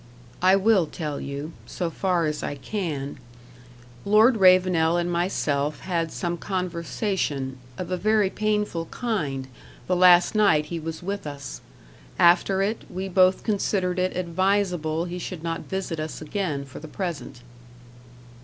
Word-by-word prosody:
"I 185 Hz, +1 st, +6 dB
will 195 Hz, -3 st, +3 dB
tell 150 Hz, -2 st, -4 dB
you 140 Hz, +3 st, -5 dB
so 175 Hz, -2 st, -3 dB
far 180 Hz, -1 st, 0 dB
as 150 Hz, -1 st, -2 dB
I 145 Hz, -, -3 dB
can. 145 Hz, -3 st, -4 dB, 0.8 s
Lord 220 Hz, +4 st, +5 dB
Ravenel 185 Hz, -3 st, +5 dB
and 175 Hz, 0 st, -1 dB
myself 155 Hz, -5 st, -1 dB
had 165 Hz, -3 st, -1 dB
some 175 Hz, 0 st, -3 dB
conversation, 170 Hz, -, -2 dB, 0.2 s
of 180 Hz, 0 st, -5 dB
a 185 Hz, -, 0 dB
very 210 Hz, +1 st, +2 dB
painful 210 Hz, -5 st, -1 dB
kind, 150 Hz, -, -3 dB, 0.4 s
the 180 Hz, -, +1 dB
last 180 Hz, -1 st, +6 dB
night 200 Hz, -9 st, +4 dB
he 165 Hz, +2 st, -5 dB
was 160 Hz, +2 st, -6 dB
with 200 Hz, -3 st, -4 dB
us. 140 Hz, -, -7 dB, 0.6 s
After 180 Hz, +3 st, +4 dB
it, 215 Hz, +3 st, -1 dB
we 190 Hz, +2 st, -4 dB
both 185 Hz, 0 st, +4 dB
considered 190 Hz, -4 st, 0 dB
it 185 Hz, 0 st, 0 dB
advisable 180 Hz, -2 st, 0 dB
he 180 Hz, 0 st, -5 dB
should 175 Hz, -2 st, -6 dB
not 165 Hz, -1 st, -4 dB
visit 190 Hz, -4 st, -3 dB
us 155 Hz, 0 st, -4 dB
again 155 Hz, -3 st, -3 dB
for 135 Hz, -, -10 dB
the 155 Hz, -, -9 dB
present." 155 Hz, -7 st, -5 dB
175 Hz, 145 wpm, -25 LUFS, 155-190 Hz, 0.8 s, I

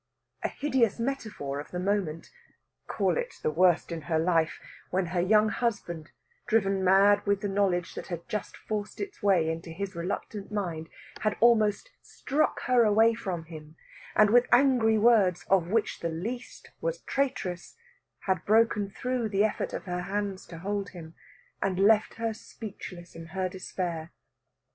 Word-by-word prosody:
A -, -, 0 dB
hideous 265 Hz, -7 st, +1 dB
metaphor 220 Hz, -, -3 dB
of 145 Hz, -, -8 dB
the 180 Hz, -, -5 dB
moment 180 Hz, -4 st, -1 dB, 0.6 s
call -, -, 0 dB
it -, -, -4 dB
the -, -, +1 dB
worst 175 Hz, +2 st, +3 dB
in 165 Hz, -1 st, -4 dB
her 160 Hz, -, +2 dB
life 165 Hz, -1 st, +1 dB, 0.3 s
when 185 Hz, 0 st, 0 dB
her 175 Hz, -, +2 dB
young 215 Hz, +4 st, +4 dB
husband, 200 Hz, -, -2 dB, 0.4 s
driven 195 Hz, -4 st, +2 dB
mad 200 Hz, +2 st, +5 dB
with 200 Hz, 0 st, +2 dB
the 205 Hz, -, -1 dB
knowledge 195 Hz, -3 st, 0 dB
that -, -, -7 dB
had 170 Hz, -2 st, -6 dB
just 210 Hz, -, -4 dB
forced 210 Hz, -1 st, -5 dB
its 400 Hz, -7 st, -6 dB
way 190 Hz, -6 st, +3 dB
into 165 Hz, +1 st, -4 dB
his 190 Hz, +4 st, -5 dB
reluctant 195 Hz, +4 st, -4 dB
mind, 170 Hz, -6 st, -3 dB, 0.3 s
had 215 Hz, -1 st, 0 dB
almost 230 Hz, -, +3 dB
struck 295 Hz, +3 st, -1 dB
her 250 Hz, -1 st, +4 dB
away 220 Hz, +2 st, +5 dB
from 185 Hz, -7 st, -4 dB
him, 155 Hz, -1 st, -11 dB, 0.4 s
and 210 Hz, -1 st, +5 dB
with 245 Hz, +1 st, +5 dB
angry 245 Hz, -4 st, +5 dB
words, 205 Hz, -6 st, +4 dB
of 185 Hz, -4 st, +4 dB
which 215 Hz, +3 st, 0 dB
the 170 Hz, -, -2 dB
least 220 Hz, +10 st, -6 dB
was -, -, -2 dB
traitress, 215 Hz, -11 st, -2 dB, 0.5 s
had 185 Hz, -3 st, -1 dB
broken 215 Hz, -2 st, +3 dB
through 250 Hz, +2 st, -2 dB
the 200 Hz, 0 st, +2 dB
effort 215 Hz, -, -1 dB
of -, -, -5 dB
her 180 Hz, -1 st, -3 dB
hands 195 Hz, +1 st, -3 dB
to 165 Hz, -, -9 dB
hold 200 Hz, +3 st, -3 dB
him, 165 Hz, -3 st, -10 dB, 0.5 s
and 190 Hz, -2 st, 0 dB
left 210 Hz, +2 st, +4 dB
her 225 Hz, -1 st, -2 dB
speechless 190 Hz, -5 st, -9 dB
in 165 Hz, 0 st, -9 dB
her 185 Hz, -1 st, +1 dB
despair. 175 Hz, -3 st, -4 dB
200 Hz, 160 wpm, -28 LUFS, 175-220 Hz, 0.6 s, mad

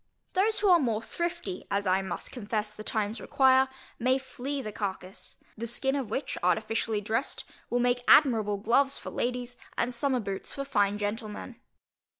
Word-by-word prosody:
Those 430 Hz, +4 st, +2 dB
who 420 Hz, -, +3 dB
are 350 Hz, -2 st, +7 dB
more 230 Hz, -7 st, +1 dB
thrifty 340 Hz, -, -4 dB
(as 200 Hz, +1 st, 0 dB
I 190 Hz, 0 st, +3 dB
must 190 Hz, -2 st, -5 dB
confess 215 Hz, -3 st, -3 dB
the 215 Hz, -, -9 dB
times 215 Hz, +1 st, -1 dB
require) 265 Hz, 0 st, +5 dB, 0.3 s
may 255 Hz, +2 st, +3 dB
flay 270 Hz, +1 st, -4 dB
the 215 Hz, -5 st, -4 dB
carcass; 190 Hz, -2 st, -5 dB, 0.2 s
the 235 Hz, +2 st, -4 dB
skin 270 Hz, +4 st, 0 dB
of 265 Hz, -6 st, -2 dB
which, 265 Hz, +6 st, -3 dB
artificially 215 Hz, +3 st, +1 dB
dressed, 220 Hz, +6 st, -2 dB, 0.3 s
will 245 Hz, -, +1 dB
make 245 Hz, 0 st, +2 dB
admirable 220 Hz, -8 st, +5 dB
gloves 255 Hz, +7 st, +2 dB
for -, -, -7 dB
ladies, 245 Hz, 0 st, -2 dB, 0.2 s
and 245 Hz, +1 st, 0 dB
summer 255 Hz, +1 st, +1 dB
boots 195 Hz, -3 st, -5 dB
for 275 Hz, -, -3 dB
fine 205 Hz, -6 st, +2 dB
gentlemen. 215 Hz, +3 st, -4 dB
235 Hz, 165 wpm, -29 LUFS, 210-265 Hz, 0.3 s, are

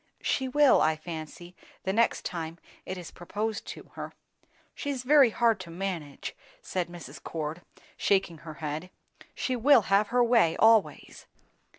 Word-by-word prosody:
"She 265 Hz, -, 0 dB
will, 290 Hz, +1 st, +5 dB
I 155 Hz, -, +3 dB
fancy, 165 Hz, +2 st, -8 dB, 0.3 s
the 190 Hz, -, -1 dB
next 230 Hz, +2 st, +2 dB
time 165 Hz, -1 st, -4 dB, 0.3 s
it 185 Hz, -, -4 dB
is 175 Hz, -2 st, -8 dB
proposed 210 Hz, +5 st, -4 dB
to -, -, -9 dB
her." -, -, -7 dB, 0.6 s
"She's 275 Hz, -3 st, -4 dB
very 275 Hz, -1 st, +6 dB
hard 225 Hz, -2 st, +2 dB
to 185 Hz, -2 st, -8 dB
manage," 170 Hz, -5 st, -5 dB, 0.2 s
said 180 Hz, -2 st, -3 dB
Mrs. 150 Hz, -5 st, -10 dB
Cord, 160 Hz, +1 st, -5 dB, 0.4 s
shaking 190 Hz, -5 st, +1 dB
her 160 Hz, -2 st, -9 dB
head. 155 Hz, +4 st, -5 dB, 0.5 s
"She 255 Hz, -, -1 dB
will 255 Hz, +1 st, +6 dB
have 205 Hz, +1 st, +4 dB
her 245 Hz, +3 st, +3 dB
own -, -, +2 dB
way, 225 Hz, -10 st, +4 dB
always." 225 Hz, -1 st, +2 dB
185 Hz, 155 wpm, -28 LUFS, 165-230 Hz, 0.6 s, very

